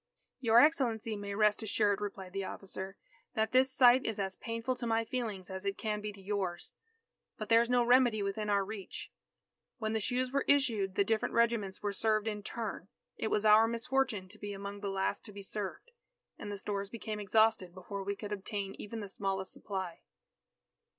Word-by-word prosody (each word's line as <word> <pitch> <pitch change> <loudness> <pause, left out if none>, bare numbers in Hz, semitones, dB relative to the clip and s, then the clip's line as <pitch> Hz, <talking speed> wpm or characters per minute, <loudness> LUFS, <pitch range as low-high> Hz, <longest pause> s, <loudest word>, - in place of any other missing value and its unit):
"Your 230 -2 +6
Excellency 240 -7 +3
may 200 -1 -5
rest 210 +1 +3
assured," 205 -2 +1
replied 195 -3 -5
the 195 0 -2
officer, 190 0 -5 0.4
"that 220 -1 +1
this 260 +1 +4
sight 255 0 +6
is 225 -2 -2
as 190 -1 -2
painful 230 +2 -3
to 240 - -4
my 225 0 +1
feelings 215 -7 -4
as 190 0 -4
it 200 0 -2
can 210 -1 -2
be 210 0 -4
to 200 - -14
yours. 190 -3 -3 0.6
But 215 - -5
there 230 0 +7
is 235 - -1
no 245 -1 +4
remedy 240 -3 +4
within 210 +2 -2
our 200 -1 +2
reach. 205 -2 -7 0.7
When 220 -3 -2
the 220 - +1
shoes 250 +3 -1
were 275 0 +1
issued, 225 -9 +2
the 200 - +4
different 220 +2 0
regiments 230 -5 +1
were 205 -1 0
served 215 +1 +1
in 210 -1 -2
turn. 210 -3 -5 0.3
It - - -2
was 215 0 +1
our 215 +1 +7
misfortune 235 -3 0
to 215 +2 -12
be 205 0 -5
among 200 +1 -6
the 200 -1 -3
last 195 0 -1
to 210 - -10
be 200 0 -9
served, 205 - -5 0.4
and 205 - -7
the 205 - -4
stores 200 0 -3
became 215 -1 -5
exhausted 210 -2 +3
before 190 +2 -6
we 200 +1 -2
could 205 0 -7
obtain 200 -1 -3
even 220 +2 -6
the 205 - -5
smallest 195 -1 -3
supply." 190 -4 -5
210 Hz, 195 wpm, -32 LUFS, 195-230 Hz, 0.7 s, there